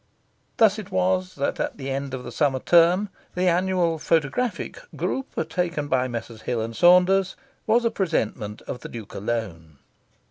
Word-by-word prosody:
Thus 220 -2 +4
it 205 -2 -8
was 185 0 0
that 140 - -2
at - - -2
the 135 -1 -5
end 135 0 -3
of 125 - -7
the 120 - -7
summer 135 +2 +1
term 175 +7 +4 0.3
the 180 +1 +1
annual 175 -2 +1
photographic 165 - -1 0.2
"group" 265 - -3
taken 170 -3 -2
by 130 -1 +2
Messrs. 115 -2 -6
Hills 115 -1 -2
and 115 0 -8
Saunders 180 +3 +5 0.3
was 235 +2 +3
a 230 - +2
presentment 110 - -2
of 125 - -6
the - - -9
Duke 115 -4 -9
alone. 95 -9 -4
160 Hz, 165 wpm, -24 LUFS, 125-185 Hz, 0.3 s, Saunders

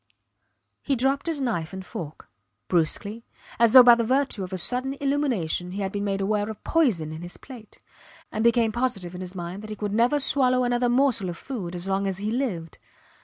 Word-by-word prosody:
He 280 - 0
dropped 270 +5 0
his 325 -3 -1
knife 190 -10 -2
and 190 0 -7
fork, 155 -4 -8 0.4
brusquely, 200 +6 0 0.4
as 230 -1 +5
though 255 -1 +11
by 240 -1 +9
the 235 0 +2
virtue 260 -3 0
of 185 - -7
a 185 - -3
sudden 255 +8 0
illumination 245 - -1
he 200 - -4
had 190 -1 -2
been 205 0 -3
made 195 -1 -1
aware 205 +1 0
of 220 - -8
poison 220 - +1
in 160 +1 -7
his 175 0 -8
plate, 240 -6 -13 0.5
and 215 - -2
became 235 -1 +3
positive 210 -7 -2
in 180 - -7
his 185 0 -6
mind 175 +2 -6
that 215 - -9
he 215 - -5
could 205 -1 -4
never 240 +6 +3
swallow 255 -3 +2
another 245 0 +1
morsel 245 -6 +2
of 170 - -6
food 195 -10 -6
as 175 +2 -4
long 195 +1 0
as 190 -2 -2
he 210 +2 -2
lived. 205 - -3
215 Hz, 210 wpm, -25 LUFS, 185-255 Hz, 0.5 s, though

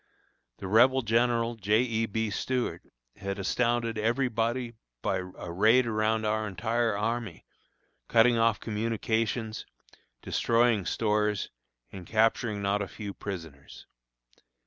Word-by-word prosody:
The 95 - -6
rebel 125 +6 +5
General 115 +1 +1
J. 110 +1 +2
E. 115 -2 0
B. 110 0 -2
Stuart 125 +5 -2 0.4
had 100 0 -4
astounded 115 +3 0
every 120 +4 +1
body 115 +1 -1 0.3
by 95 - 0
a 90 -2 -7
raid 110 +8 +4
around 110 0 0
our 110 0 0
entire 110 +2 -1
army, 115 +2 -3 0.6
cutting 115 +1 +5
off 115 -2 +2
communications, 110 0 -2 0.6
destroying 115 -5 +2
stores, 105 -2 0 0.4
and 95 -3 -9
capturing 110 -1 +1
not 100 +1 +1
a 100 - -3
few 100 -1 -7
prisoners. 80 -10 -8
110 Hz, 120 wpm, -28 LUFS, 105-115 Hz, 0.6 s, rebel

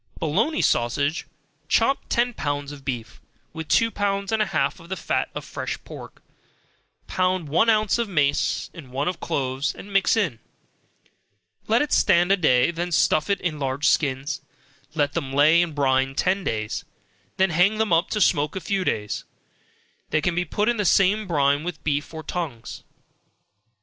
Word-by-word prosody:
Bologna 170 - 0
Sausage 140 +7 0 0.4
Chop 270 - +2
ten 245 0 +1
pounds 145 -5 -3
of 145 -2 -11
beef, 120 -5 -5 0.3
with 160 -1 -6
two 230 0 +3
pounds 200 0 -1
and 220 -1 +1
a 215 - +1
half 155 -6 -1
of 170 0 -15
the 190 - -2
fat - - -1
of - - -5
fresh - - -4
pork, - - -11 0.8
pound 185 -3 0
one 165 +10 +3
ounce 215 0 +2
of 230 -3 -1
mace, 145 -6 0
and 150 -6 -11
one 140 +3 -2
of 180 -1 -2
cloves, 135 -2 -2
and 200 0 -11
mix 195 +3 +3
in, 165 - 0 1.3
let 230 +5 +3
it 295 - -5
stand 175 +2 +4
a - - +6
day, 130 -6 +3
then 175 +1 -4
stuff 155 0 +2
it 200 -1 +1
in 155 -4 -2
large 135 +1 -1
skins, 140 -1 0 0.5
let 145 -2 +1
them 145 -5 -3
lay 150 +5 +5
in 175 -2 -1
brine 135 -1 +1
ten 190 +5 +1
days, 110 -5 -3 0.5
then 190 -1 +3
hang 180 +6 +3
them 220 -4 +1
up 170 +4 +2
to 215 - -1
smoke 150 -5 +2
a - - -2
few 195 0 -1
days, 105 - -2 0.9
they 155 - +2
can 170 +3 0
be 180 +1 0
put 205 +6 -1
in 240 0 +2
the 205 - 0
same 195 +3 +3
brine 145 -3 +2
with 175 +1 -6
beef 145 -1 -1
or 160 -1 -7
tongues. 150 -9 -5
165 Hz, 175 wpm, -24 LUFS, 140-195 Hz, 1.3 s, a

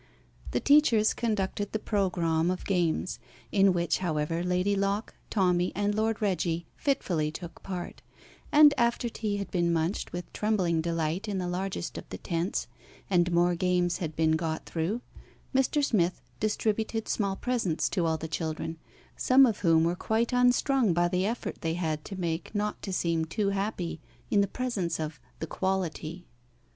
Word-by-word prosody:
The 120 - 0
teachers 245 - +5
conducted 205 -3 -2
the - - +2
programme 175 -6 +1
of 185 - -3
games 175 -2 0 0.3
in 195 -1 +5
which, 175 -1 0
however, 165 -2 -1
Lady 180 +3 +1
Locke, 200 +2 -1 0.2
Tommy, 180 -3 +2
and 205 +1 +1
Lord 220 +1 0
Reggie 175 -4 0
fitfully 180 - 0
took 170 +2 -8
part; 180 -2 -6 0.5
and 295 -1 +8
after 235 0 +1
tea 215 -2 -2
had 200 - -5
been 170 -2 +1
munched 165 +4 -1
with 175 0 -6
trembling 185 -6 +1
delight 165 +4 -1
in 200 -2 -2
the 180 -1 -2
largest 180 -1 -3
of - - -13
the - - -6
tents, 170 +1 -2 0.5
and 175 -1 +3
more 175 +1 +3
games 180 0 +1
had 160 -3 -4
been 160 0 +2
got 160 0 -1
through, 175 +9 -2 0.5
Mr. 270 +2 +2
Smith 185 -8 +1 0.2
distributed 215 +1 -1
small 200 -3 0
presents 225 -9 0
to 175 -4 0
all 160 0 +1
the 160 - -5
children, 160 0 -3 0.4
some 265 +1 +6
of 225 -5 0
whom 165 -3 +4
were 170 +1 +1
quite 225 +6 0
unstrung 250 - +3
by 175 0 +3
the 180 +2 0
effort 230 +2 -4
they 165 0 -1
had 155 -3 -2
to 195 -2 -6
make 170 +3 -3
not 210 0 -1
to 195 - -4
seem 170 -3 0
too 200 +5 -1
happy 195 -4 -2 0.3
in 205 - +5
the 200 - +2
presence 200 -11 -2
of 155 -3 -4 0.2
"the - - -4
quality." 175 -1 -2
185 Hz, 165 wpm, -28 LUFS, 170-210 Hz, 0.5 s, and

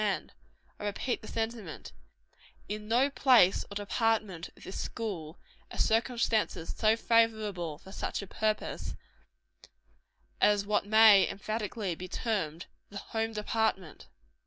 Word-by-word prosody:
And 205 -2 -2 0.5
I 210 - -5
repeat 210 +4 -2
the 215 - -10
sentiment 225 -7 -4 0.8
in 210 0 -5
no 250 +5 +3
place 245 -9 +5
or 200 - -9
department 205 -3 -1
of - - -15
this 190 - -6
school 180 -8 -5 0.3
are - - -8
circumstances 225 -6 +1
so 220 0 +3
favorable 215 -9 +1
for 190 - -14
such 200 - -3
a - - -6
purpose, 215 +2 -2 1.5
as 205 -1 +4
what 205 -1 0
may, 215 -2 +7
emphatically, 210 -1 -3
be 180 +3 -7
termed 180 -7 -2 0.2
the 200 - -8 0.2
_home 225 0 -1
department. 210 -5 -1
210 Hz, 125 wpm, -30 LUFS, 195-225 Hz, 1.5 s, may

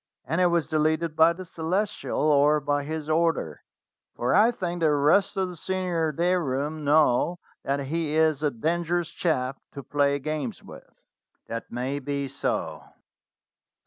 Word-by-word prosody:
"And 165 +3 0
it 180 - +5
was 170 -2 +1
deleted 155 +1 0
by 160 +1 +6
the 185 +2 -7
Celestial, 180 +6 -2
or 150 0 +4
by 145 0 0
his 155 +1 -5
order, 160 - 0 0.5
for 120 - 0
I 215 +3 +6
think 175 -7 -3
the 160 - +4
rest 150 +9 +3
of 190 -1 +1
the 180 - -8
senior 175 -2 -1
day 175 +4 +1
room 150 0 -2
know 150 +2 +3 0.3
that 140 +1 -1
he 155 +2 -2
is 155 -2 +2
a 150 - +2
dangerous 170 +6 -1
chap 135 -6 -1
to 140 - -7
play 140 +2 +1
games 145 -6 -4
with." - - -13 0.6
"That 115 0 -6
may 130 +4 -2
be 140 0 -3
so." 135 - -3
155 Hz, 155 wpm, -26 LUFS, 140-170 Hz, 0.6 s, by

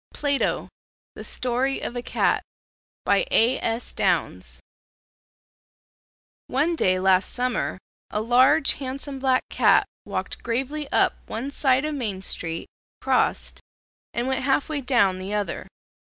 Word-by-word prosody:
PLATO: 285 -2 0 0.5
THE - - -9
STORY 255 +2 -1
OF 240 - -4
A 245 - -2
CAT - - +1 0.6
By - - +3
A. 240 +4 +4
S. 230 +2 -3
Downs - - -1 1.9
One 305 +6 +1
day 185 - +2
last 185 0 +3
summer 250 -5 -1 0.3
a 210 - -2
large 245 +4 +4
handsome 270 +1 -5
black 260 -1 +2
cat - - +4 0.2
walked - - -4
gravely 270 +5 -2
up - - +4
one 250 +6 -4
side 265 -1 +2
of 305 - -2
Main 210 -9 -3
street, 165 -3 -3 0.3
crossed, - - 0 0.5
and 240 +2 -2
went 265 -1 0
half 270 +2 +1
way 300 -2 -2
down 235 -8 +2
the 195 +3 -4
other. 205 -1 -3
255 Hz, 130 wpm, -24 LUFS, 220-275 Hz, 1.9 s, A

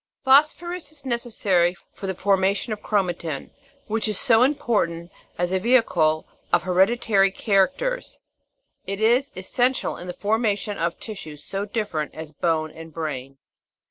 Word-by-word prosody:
Phosphorus 305 +5 +3
is 295 -3 -15
neces 240 -2 -2
sary 175 -4 +2 0.2
for 195 - -7
the 190 - -2
formation 195 +3 +1
of 210 - -7
chromatin, 175 -7 -2 0.3
which 220 +1 -1
is 215 - 0
so 240 -5 +4
important 205 - +1 0.3
as 175 0 0
a 190 - +2
vehicle 185 -9 +3 0.3
of 175 - +3
hereditary 195 +2 +3
characters; 230 - 0 0.7
it 195 +1 -3
is 240 +6 +3
essential 245 +7 0
in 180 - -8
the 180 - -4
formation 210 0 0
of 170 +1 -1
tissues 155 -9 -8
so 195 +1 -3
different 200 -8 -3
as 160 -1 -7
bone 155 0 0
and 165 0 -11
brain. 135 -4 -5
195 Hz, 140 wpm, -24 LUFS, 170-235 Hz, 0.7 s, so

